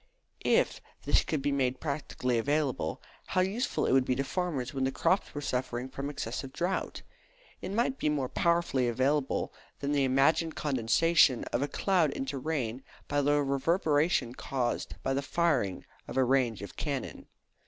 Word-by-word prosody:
If - - +2 0.2
this - - +3
could 150 -4 -2
be 145 - +1
made 130 -2 0
practically 140 -5 -1
available, 140 - -1 0.2
how 185 - +2
useful 205 +8 0
it - - +1
would 130 0 +5
be 125 - 0
to 135 - 0
farmers 140 -4 -2
when 135 -1 -1
the 130 - +1
crops 185 +6 +1
were 145 - -3
suffering 125 -2 -2
from 140 +2 -4
excessive 130 -1 -4
drought! 180 +6 -2 0.6
It - - -5
might 240 +5 0
be - - +1
more 140 -4 0
powerfully 170 -5 +1
available 130 +4 0 0.3
than 140 0 -2
the 145 -1 +2
imagined 140 +5 +3
condensation 135 +1 +3
of 120 - +1
a 145 - +1
cloud 180 -1 +2
into 135 0 -3
rain 130 -5 -2 0.3
by 145 0 +1
the 145 +1 +3
reverberation 145 -2 +1
caused 125 -2 -2
by 135 - 0
the 135 - 0
firing 140 - 0 0.2
of - - -6
a 130 - +5
range 125 -6 +1
of 100 - -9
cannon. 140 -4 -4
140 Hz, 165 wpm, -30 LUFS, 130-155 Hz, 0.6 s, would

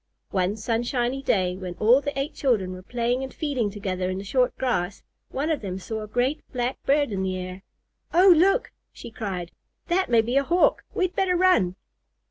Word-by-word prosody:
One 185 +1 0
sunshiny 240 +4 -1
day, 185 -8 +1
when 180 -2 -6
all 235 +8 +4
the 285 0 -4
eight 275 +3 -2
children 220 - +1
were 185 - -8
playing 240 +5 -1
and 265 0 -5
feeding 265 -9 -1
together 190 -3 -3
in 185 - -2
the 195 - -5
short 250 +5 +1
grass, 200 -7 -1 0.3
one 290 +5 -1
of 310 - -1
them 190 -3 -4
saw 220 +3 -5
a 215 - -6
great 245 +7 0
black 245 0 -2
bird 285 -2 +3
in 195 -2 -2
the 185 -1 -1
air. 185 +1 -6 0.5
"Oh, 365 +2 +7
look!" 390 +8 +3 0.2
she - - -10
cried. 190 -6 -5 0.4
"That 370 +2 +1
may 230 -2 +5
be 240 +4 0
a 280 - +4
Hawk. 345 +5 +2
We'd 370 -1 0
better 370 -2 +2
run." 345 - +3
240 Hz, 195 wpm, -25 LUFS, 190-280 Hz, 0.5 s, Oh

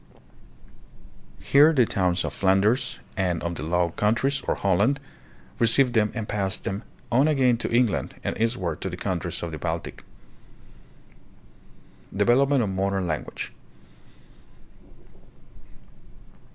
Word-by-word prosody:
Here 145 +3 +5
the 130 -5 +4
towns 90 -3 0
of - - -4
Flanders 100 +5 +1 0.2
and 90 -4 -1
of 85 0 -2
the - - -6
Low 85 +2 0
Countries, 115 +9 0
or - - +1
Holland, 100 +9 +1 0.6
received 120 +2 +4
them 105 -2 +2
and 110 -3 -4
passed 95 -2 -1
them 95 +2 -4 0.3
on 130 +5 +4
again 130 -5 +3
to - - -3
England 120 -3 +1
and - - -2
eastward 115 +2 -1
to - - -3
the - - -7
countries - - -3
of 85 - -4
the 80 - -6
Baltic. 80 -1 -4 2.1
Development 130 +5 +3
of 105 - -2
Modern 95 0 -1
Language. 75 -3 -4
105 Hz, 120 wpm, -25 LUFS, 95-125 Hz, 2.1 s, Here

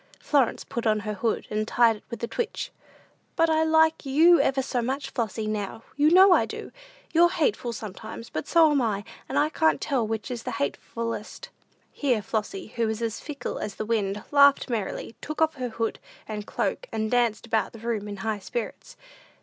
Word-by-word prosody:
Florence 275 -6 +1
put 235 -1 -3
on 215 -1 +2
her 210 0 -3
hood, 220 +2 -1
and 215 0 -1
tied 230 -2 +4
it - - -20
with 235 -1 -7
a - - 0
twitch. 450 - -3 0.6
"But 330 -1 +3
I 315 0 +3
like 320 0 +3
you 320 +5 +5
ever 270 0 +1
so 255 -2 -1
much, 265 +4 -3
Flossy; 225 -2 -2
now, 215 +1 -3
you 295 +2 +4
know 375 +3 +7
I - - +3
do. - - -7 0.4
You're 340 +1 +6
hateful 370 - 0
sometimes; 225 +1 -8
but 155 - -4
so 325 -2 +5
am 285 -2 +3
I; 210 -4 -1 0.3
and - - -1
I 300 - +3
can't 320 0 +2
tell 255 -6 0
which 220 +2 -3
is 240 -2 -4
the - - -5
hatefulest." 230 +9 -4 0.4
Here 250 -7 0
Flossy, 210 0 -4
who 230 -1 +2
was 220 +1 -2
as 225 -1 -2
fickle 290 -2 -5
as 205 - -4
the 215 - -4
wind, 210 -2 -1
laughed 280 -2 +5
merrily, 220 0 -3
took 305 - -5
off 320 0 +3
her 250 -1 -3
hood 225 0 -2 0.3
and 210 -1 -5
cloak, - - -2
and 220 0 -2
danced 240 -2 +1
about 225 -1 0
the - - -11
room 220 -2 -3
in 205 -1 -6
high 215 -2 -1
spirits. 230 +3 -6
235 Hz, 200 wpm, -26 LUFS, 215-285 Hz, 0.6 s, know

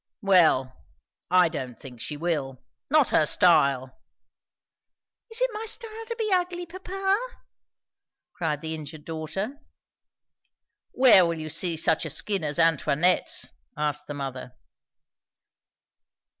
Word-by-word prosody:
"Well, 160 -9 +3 0.5
I 180 -1 +5
don't 130 -8 -6
think 125 -3 -11
she 150 - -5
will. 145 -6 -3 0.3
Not 300 -2 +4
her 155 - +3
style." 140 -8 +3 1.3
"Is 450 +1 -5
it - - +1
my 430 +1 -5
style 450 0 -5
to 465 - -4
be 440 -3 -2
ugly, 355 -1 -1
papa?" 385 +3 -2 1.1
cried 160 -6 -2
the 160 -1 -3
injured 155 -1 -8
daughter. 170 - -5 1.3
"Where 245 -8 +6
will 170 -1 -1
you 155 -1 -5
see 165 +1 0
such 160 0 +2
a 160 - -4
skin 190 +4 -1
as 150 0 -2
Antoinette's?" 165 +1 +2 0.3
asked 150 0 -2
the 145 - -6
mother. 135 -3 -6
165 Hz, 120 wpm, -26 LUFS, -, 1.3 s, Where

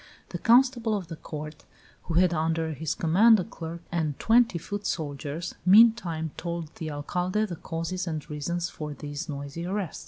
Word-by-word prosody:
The - - -5
constable 240 -2 +4
of 180 -5 -7
the 165 - -5
court, 155 0 -8 0.4
who 165 - -3
had 180 0 +4
under 160 0 0
his 155 +1 -3
command 210 +7 +5
a - - 0
clerk 170 0 -8
and 160 -4 -1
twenty 230 -4 +4
foot 205 +5 -5
soldiers, 150 +2 -4
meantime 185 -6 +5
told 170 -2 -4
the 160 - -4
Alcalde 180 +8 -1
the 180 -5 -5
causes 165 +3 -4
of 165 - -1
and 150 - -6
reasons 170 +4 -2
for 150 -2 -6
this 145 +3 -6
noisy 140 +3 -5
arrest. 190 -1 -3
170 Hz, 175 wpm, -27 LUFS, 155-185 Hz, 0.4 s, command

